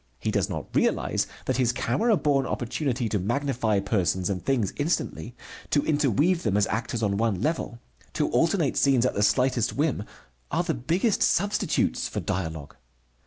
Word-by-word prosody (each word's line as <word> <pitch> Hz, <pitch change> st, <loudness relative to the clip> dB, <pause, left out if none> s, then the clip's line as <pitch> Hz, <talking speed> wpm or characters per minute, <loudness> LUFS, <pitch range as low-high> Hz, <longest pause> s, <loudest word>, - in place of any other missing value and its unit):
He -, -, -2 dB
does -, -, 0 dB
not -, -, -6 dB
realize -, -, +1 dB, 0.2 s
that -, -, 0 dB
his 125 Hz, -2 st, +2 dB
camera 210 Hz, -, +1 dB
born 140 Hz, -4 st, +1 dB
opportunity 125 Hz, 0 st, -2 dB
to 105 Hz, -1 st, -1 dB
magnify 120 Hz, 0 st, 0 dB
persons 95 Hz, -2 st, 0 dB
and 90 Hz, -3 st, -4 dB
things 115 Hz, -4 st, 0 dB
instantly, 145 Hz, -5 st, -2 dB, 0.3 s
to 145 Hz, -, +1 dB
interweave 150 Hz, -, +2 dB
them 105 Hz, -3 st, +1 dB
as 105 Hz, -, +3 dB
actors 115 Hz, +1 st, -2 dB
on 100 Hz, -1 st, +1 dB
one 110 Hz, -4 st, 0 dB
level, 150 Hz, -, -2 dB, 0.4 s
to -, -, 0 dB
alternate -, -, +2 dB
scenes 130 Hz, -3 st, +3 dB
at -, -, +1 dB
the 105 Hz, -, -1 dB
slightest 125 Hz, +1 st, +2 dB
whim, 145 Hz, -6 st, 0 dB, 0.5 s
are 170 Hz, +3 st, 0 dB
the 170 Hz, -2 st, -1 dB
big 160 Hz, +8 st, -2 dB, 0.2 s
substitutes 205 Hz, +3 st, +1 dB
for -, -, -4 dB
dialogue. 80 Hz, -5 st, -4 dB
125 Hz, 165 wpm, -26 LUFS, 105-145 Hz, 0.5 s, as